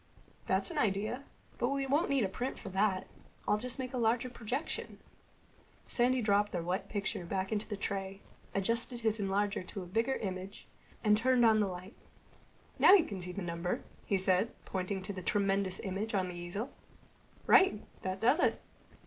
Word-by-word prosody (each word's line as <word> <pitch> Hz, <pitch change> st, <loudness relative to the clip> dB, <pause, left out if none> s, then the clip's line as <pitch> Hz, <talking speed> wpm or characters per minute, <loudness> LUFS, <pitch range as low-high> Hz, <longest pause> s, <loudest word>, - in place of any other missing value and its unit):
"That's -, -, +1 dB
an 315 Hz, -, -2 dB
idea. 215 Hz, +5 st, 0 dB, 0.3 s
But 240 Hz, -, +2 dB
we 275 Hz, 0 st, 0 dB
won't 290 Hz, +6 st, +2 dB
need 275 Hz, -4 st, +3 dB
a -, -, +2 dB
print 245 Hz, +7 st, -3 dB
for -, -, -7 dB
that. 190 Hz, 0 st, +1 dB, 0.4 s
I'll 210 Hz, 0 st, +3 dB
just 250 Hz, +3 st, -5 dB
make 260 Hz, -1 st, -4 dB
a 255 Hz, -, -1 dB
larger 235 Hz, +2 st, +1 dB
projection." 245 Hz, +6 st, -4 dB, 0.9 s
Sandy 250 Hz, 0 st, +2 dB
dropped 205 Hz, 0 st, +2 dB
the 175 Hz, -2 st, -1 dB
wet 180 Hz, +3 st, -2 dB
picture 200 Hz, -3 st, -2 dB
back 190 Hz, +3 st, -2 dB
into 215 Hz, 0 st, -1 dB
the 205 Hz, -, -4 dB
tray, 195 Hz, 0 st, -3 dB, 0.3 s
adjusted 230 Hz, +4 st, +1 dB
his 220 Hz, -1 st, +1 dB
enlarger 200 Hz, +1 st, 0 dB
to 195 Hz, -4 st, -5 dB
a -, -, -8 dB
bigger 225 Hz, +8 st, 0 dB
image, 190 Hz, 0 st, -5 dB, 0.4 s
and 210 Hz, -1 st, +5 dB
turned 245 Hz, +2 st, +4 dB
on 220 Hz, -1 st, +6 dB
the 205 Hz, -, +2 dB
light. 185 Hz, +3 st, -7 dB, 0.9 s
"Now -, -, +9 dB
you 380 Hz, -5 st, +7 dB
can 195 Hz, -3 st, -5 dB
see 180 Hz, 0 st, -4 dB
the 195 Hz, +1 st, -5 dB
number," 170 Hz, +1 st, -2 dB, 0.2 s
he 200 Hz, -, +1 dB
said, 190 Hz, +4 st, +2 dB
pointing 190 Hz, 0 st, -3 dB
to 200 Hz, -, -4 dB
the 185 Hz, -, -6 dB
tremendous 195 Hz, 0 st, +1 dB
image 205 Hz, +3 st, -3 dB
on 185 Hz, -2 st, +1 dB
the 180 Hz, -, -6 dB
easel. 175 Hz, +9 st, -4 dB, 0.7 s
"Right. 375 Hz, -, +5 dB, 0.2 s
That 185 Hz, 0 st, -3 dB
does 250 Hz, +9 st, +4 dB
it." -, -, +2 dB
205 Hz, 185 wpm, -33 LUFS, 190-235 Hz, 0.9 s, Now